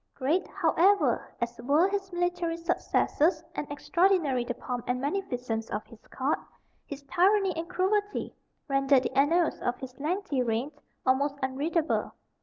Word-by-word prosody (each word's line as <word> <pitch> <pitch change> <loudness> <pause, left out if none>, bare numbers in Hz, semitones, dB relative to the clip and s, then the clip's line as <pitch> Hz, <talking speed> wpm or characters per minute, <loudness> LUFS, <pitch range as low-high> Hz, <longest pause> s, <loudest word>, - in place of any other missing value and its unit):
Great, 305 +8 0
however, 395 +4 +2
as 235 -1 -3
were 290 +8 +4
his 390 -1 -3
military 350 -1 -1
successes, 335 0 +1
and 290 - -5
extraordinary 335 -5 +2
the 245 0 -4
pomp 245 -2 -4
and 250 0 0
magnificence 250 - -2
of 210 - -3
his 230 - -16
court, 270 +3 -1 0.5
his 285 0 -7
tyranny 375 +5 +3
and 330 +1 -4
cruelty 410 +3 0 0.3
render 275 -1 +4
the 260 - -4
annals 320 +5 +3
of 245 - -1
his 255 -1 -9
lengthy 310 -2 -1
reign 240 +4 -1 0.3
almost 275 +2 +2
unreadable. 300 +5 0
290 Hz, 140 wpm, -28 LUFS, 260-360 Hz, 0.5 s, were